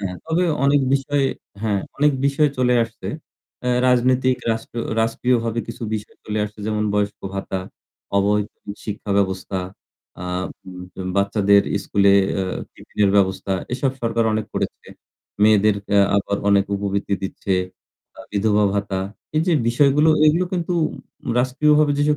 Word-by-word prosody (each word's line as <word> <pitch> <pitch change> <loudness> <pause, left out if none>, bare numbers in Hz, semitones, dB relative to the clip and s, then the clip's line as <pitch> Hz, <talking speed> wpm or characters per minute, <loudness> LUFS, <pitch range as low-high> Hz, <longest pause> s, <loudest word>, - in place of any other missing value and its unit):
হ্যাঁ, 90 -2 -4
তবে 165 +3 +1 0.2
অনেক 140 +1 +4
বিষয়ে 140 0 +1 0.4
হ্যাঁ 105 -3 +1 0.2
অনেক 150 +1 +3
বিষয় 140 +2 +3
চলে 125 -1 +3
আসছে। 115 0 -9 0.6
আ - - +2 0.2
রাজনৈতিক 130 +1 +3 0.2
রাষ্ট্র 115 +1 -7 0.2
রাষ্ট্রীয়ভাবে 115 0 0
কিছু 115 - -7
বিষয় 105 -1 -6
চলে 105 0 -3
আসছে, 105 +1 -9
যেমন 105 -1 0
বয়স্ক 105 0 -1
ভাতা, 95 -1 -3 0.6
অবৈতনিক 105 +1 -1
শিক্ষা 105 -1 -5
ব্যবস্থা, 95 0 -1 0.6
আম 90 +1 -3 0.5
যেমন 95 0 -5
বাচ্চাদের 100 0 +4
স্কুলে 100 0 +3 0.3
আ - - 0 0.3
টিফিনের 100 -2 0
ব্যবস্থা, 95 0 +1 0.2
এসব 130 +2 0
সরকার 115 0 +1
অনেক 110 0 -1
করেছে। - - -3 0.6
মেয়েদের 105 -1 +5 0.2
আ - - +6 0.2
আবার 100 0 0
অনেক 100 -1 +4
উপবৃত্তি 100 0 -1
দিচ্ছে। 95 0 -2 0.6
তা - - -12
বিধবা 105 0 +2
ভাতা, 100 -2 -1 0.4
এই 155 - +3
যে 180 - +3 0.2
বিষয়গুলো, 140 +5 +4 0.2
এগুলো 165 +4 +3
কিন্তু 180 -1 -1 0.7
রাষ্ট্রীয়ভাবে 150 +4 +3
যেসব 150 +1 +2
110 Hz, 135 wpm, -21 LUFS, 100-130 Hz, 0.7 s, আ